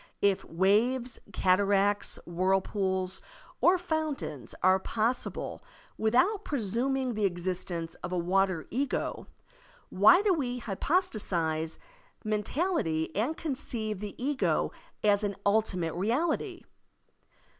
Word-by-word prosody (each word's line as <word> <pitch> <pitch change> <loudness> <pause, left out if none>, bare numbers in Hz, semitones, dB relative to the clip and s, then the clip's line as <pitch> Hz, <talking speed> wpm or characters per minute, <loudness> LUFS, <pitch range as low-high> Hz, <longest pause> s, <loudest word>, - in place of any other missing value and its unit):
If 200 -2 +3
waves, 230 +8 +1
cataracts, 200 +2 +2
whirlpools, 190 +1 0 0.4
or 365 +2 +6
fountains 315 - -3
are 185 +1 +5
possible 230 +5 -2 0.3
without 255 - +2
presuming 255 +1 -1
the 215 -1 0
existence 175 -2 -3
of - - -5
a 180 - 0
water 185 -1 +1
ego, 275 +3 -2 0.6
why 215 - +6
do 405 -3 +4
we 250 -7 -1
hypostatize 195 - -1 0.5
mentality 215 - -1
and 250 +10 0
conceive 235 - -3
the 205 -1 -6
ego 275 +2 0 0.3
as 205 0 +3
an 200 -1 -1
ultimate 200 -5 +1
reality? 245 - -1
210 Hz, 100 wpm, -29 LUFS, 185-260 Hz, 0.6 s, or